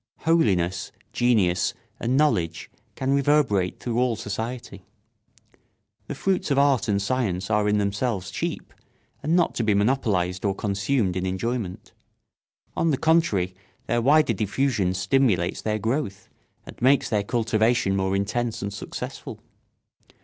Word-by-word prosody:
Holiness, 95 - +1 0.2
genius, 100 -8 +2 0.2
and 125 +3 0
knowledge 90 - 0 0.2
can 135 +1 0
reverberate 140 -10 +2
through 120 -1 -2
all 125 -2 +2
society. 110 0 -5 1.2
The - - -5
fruits 190 -3 0
of 140 - +1
art 140 -6 +3
and 100 -2 +1
science 100 -4 -1
are 105 -1 +2
in 105 - +2
themselves 100 -1 -1
cheap - - -4 0.5
and 155 +4 +1
not 175 -2 +2
to 120 - -1
be 105 -2 +2
monopolised 100 -5 +1
or 100 -2 0
consumed 100 0 0
in 95 0 -1
enjoyment. 95 0 -4 0.8
On 165 - +1
the 140 - +1
contrary, 145 - +2 0.3
their 120 0 0
wider 145 0 +4
diffusion 105 -2 0
stimulates 95 -2 +1
their 110 0 -1
growth 110 -3 -2 0.4
and - - -12
makes 135 +3 +4
their 105 -4 +1
cultivation 110 -1 +1
more 95 0 0
intense 110 +3 -2
and 100 0 -4
successful. - - -7
110 Hz, 135 wpm, -24 LUFS, 95-130 Hz, 1.2 s, wider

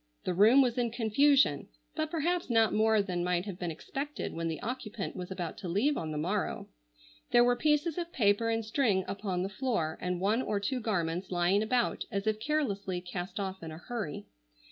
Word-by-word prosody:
The 180 - -1
room 220 +9 +6
was 245 -1 0
in 240 -1 +1
confusion, 260 +5 +3 0.3
but 310 -1 -1
perhaps 340 +1 -1
not 225 -2 +4
more 220 -1 +3
than 180 -3 -2
might 180 +1 0
have 195 -3 -6
been 175 - -2
expected 275 - -5
when 165 0 -2
the 160 -1 -3
occupant 230 -4 -4
was 180 -1 -6
about 180 -3 -5
to 195 - -6
leave 235 - +2
on 160 - -3
the 155 - -3
morrow. 185 +6 -2 0.6
There 240 - +6
were 245 0 +4
pieces 300 +4 +1
of 340 -1 -4
paper 215 0 +2
and 225 -1 0
string 215 -5 +1
upon 195 -3 -2
the - - -1
floor 200 - -2
and 180 -1 -1
one 210 +6 +2
or 210 -5 -1
two 250 +6 -1
garments 180 -6 -1
lying 180 +3 +2
about 240 +2 0
as 200 -1 -2
if 215 0 0
carelessly 215 -9 -1
cast 180 +2 -5
off 190 -1 -4
in 165 - -6
a 155 - -8
hurry. 210 - -5
210 Hz, 200 wpm, -30 LUFS, 180-245 Hz, 0.6 s, room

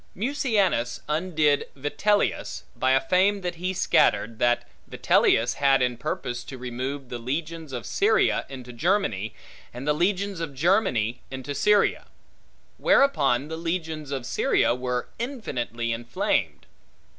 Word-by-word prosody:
Mucianus 210 - 0
undid 155 -2 +1
Vitellius, 145 - 0
by 130 0 +2
a 135 - +5
fame 195 +4 +3
that 175 -2 -4
he 185 +1 0
scattered, 115 -10 +2
that 120 0 +2 0.2
Vitellius 115 +2 +2
had 135 -2 +4
in 125 -1 0
purpose 120 0 -4
to 130 - -8
remove 130 +2 -5
the 120 - -5
legions 155 +5 -4
of 125 -2 -5
Syria 440 +3 +2
into 125 -2 -9
Germany, 120 - 0 0.4
and 125 +4 -7
the 150 - +4
legions 195 +3 0
of 160 -4 -5
Germany 130 - +1
into 130 +1 -5
Syria; 210 +7 +2 0.7
whereupon 140 - +3
the 160 +1 -5
legions 160 -3 -3
of 135 -3 -4
Syria 125 - +2
were 125 0 -2
infinitely 125 - -3
inflamed. 120 +1 -1
145 Hz, 130 wpm, -25 LUFS, 125-185 Hz, 0.7 s, a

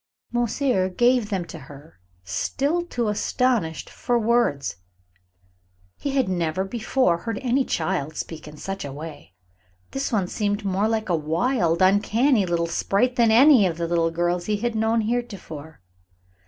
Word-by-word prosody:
Monsieur 240 -4 +1
gave 240 +2 +2
them 190 -4 -2
to 165 - -9
her, 145 +1 -14 0.2
still 285 - -1
too 245 -10 -3
astonished 210 -5 0
for 245 -1 -1
words. 225 - +1 1.2
He 285 - -4
had 265 -6 +2
never 175 -1 -1
before 215 -3 0
heard 225 +3 -4
any 260 +2 +2
child 160 - -2
speak 160 -2 -6
in 150 0 -11
such 195 +5 -5
a 140 - -6
way. 150 - -9 0.6
This 270 0 -2
one 205 -5 +1
seemed 205 +2 -2
more 195 +2 +1
like 220 -2 -1
a 175 - +3
wild, 170 - +1
uncanny 210 +3 +3
little 170 -1 0
sprite 200 +8 0
than 235 -2 +4
like 220 - +5
any 270 -9 +7
of 165 -2 -3
the 170 - -1
little 165 -1 +1
girls 175 +1 -1
he 210 -1 +1
had 235 +3 -2
known 225 +1 +1
heretofore. 200 - -5
200 Hz, 155 wpm, -24 LUFS, 170-240 Hz, 1.2 s, any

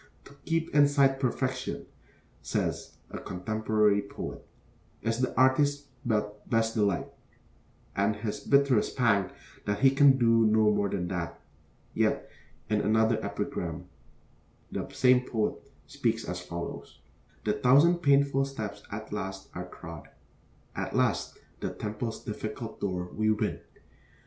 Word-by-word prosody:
'To - - -14
keep 165 0 -1
in 145 -1 +6
sight 135 -2 +3
Perfection,' 130 0 -2 0.6
says - - -2 0.2
a - - -5
contemporary 105 +2 +1
poet, 100 - -7 0.6
'is 115 +1 0
the 130 - +1
artist's 140 +2 +3
best 115 +1 0
delight,' 100 -5 0 0.8
and 100 +2 +2
his 105 0 -4
bitterest 140 -5 +2
pang 105 -6 +3 0.4
that 105 +2 -1
he 135 -1 +7
can 135 0 +6
do 115 -2 +4
no 110 0 +4
more 100 -1 +1
than 90 -3 -2
that; 85 -3 -4 0.5
yet - - +1 0.4
in 105 -1 +1
another 110 +1 +2
epigram 90 -4 -3 0.9
the - - -4
same 125 -1 +4
poet 110 -4 -2 0.2
speaks - - -1
as 90 +1 -4
follows: 85 -1 -7 0.5
The - - +1
thousand 145 +8 +5
painful 140 -3 +3
steps 105 -7 -6
at 110 +1 -6
last 95 -1 -5
are - - -6
trod, 85 -3 -10 0.7
At - - -3
last - - +1 0.2
the - - -2
temple's 110 +2 -5
difficult 110 +2 -5
door 90 -3 -2
we 110 0 +1
win. 105 -1 0
110 Hz, 130 wpm, -29 LUFS, 100-130 Hz, 0.9 s, he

